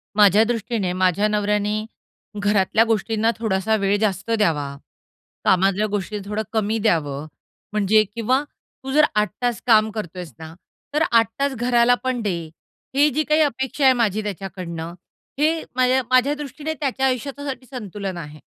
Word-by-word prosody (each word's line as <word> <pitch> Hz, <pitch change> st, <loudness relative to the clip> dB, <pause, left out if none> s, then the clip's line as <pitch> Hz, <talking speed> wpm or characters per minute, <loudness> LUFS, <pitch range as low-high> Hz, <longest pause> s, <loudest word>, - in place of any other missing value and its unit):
माझ्या 210 Hz, +1 st, +6 dB
दृष्टीने 225 Hz, -4 st, -1 dB
माझ्या 185 Hz, +3 st, +2 dB
नवऱ्याने 210 Hz, 0 st, 0 dB, 0.6 s
घरातल्या 205 Hz, +2 st, +3 dB
गोष्टींना 225 Hz, +1 st, +1 dB
थोडासा 220 Hz, 0 st, +1 dB
वेळ 200 Hz, -1 st, +1 dB
जास्त 205 Hz, +1 st, -1 dB
द्यावा, 155 Hz, -10 st, 0 dB, 0.7 s
कामातल्या 195 Hz, +3 st, +3 dB
गोष्टी 205 Hz, +1 st, -3 dB
थोडं 210 Hz, +2 st, -2 dB
कमी 220 Hz, 0 st, 0 dB
द्यावं 155 Hz, -8 st, 0 dB, 0.5 s
म्हणजे 215 Hz, +1 st, +4 dB
किंवा 255 Hz, +5 st, +1 dB, 0.4 s
तू 265 Hz, -, -5 dB
जर 300 Hz, +1 st, +5 dB
8 210 Hz, 0 st, +2 dB
तास 240 Hz, -4 st, -1 dB
काम 220 Hz, -1 st, +5 dB
करतोयेस 180 Hz, -, -6 dB
ना, 160 Hz, 0 st, -9 dB, 0.4 s
तर 310 Hz, +2 st, +2 dB
8 230 Hz, -1 st, +5 dB
तास 280 Hz, -1 st, +1 dB
घराला 240 Hz, 0 st, +3 dB
पण 255 Hz, -2 st, -1 dB
दे, 195 Hz, -5 st, -1 dB, 0.6 s
ही 290 Hz, +2 st, +5 dB
जी 310 Hz, +4 st, 0 dB
काही 305 Hz, +1 st, +2 dB
अपेक्षा 265 Hz, 0 st, -1 dB
आहे 260 Hz, -, +7 dB
माझी 215 Hz, -3 st, +1 dB
त्याच्याकडून 185 Hz, -4 st, -6 dB, 0.6 s
हे 320 Hz, +2 st, +2 dB
माझ्या 255 Hz, +1 st, +3 dB
माझ्या 255 Hz, +3 st, +4 dB
दृष्टीने 295 Hz, +2 st, -5 dB
त्याच्या 265 Hz, -2 st, -1 dB
आयुष्याच्यासाठी 270 Hz, +1 st, -3 dB
संतुलन 205 Hz, -7 st, -6 dB
आहे. 150 Hz, -2 st, -9 dB
215 Hz, 145 wpm, -22 LUFS, 195-255 Hz, 0.7 s, आहे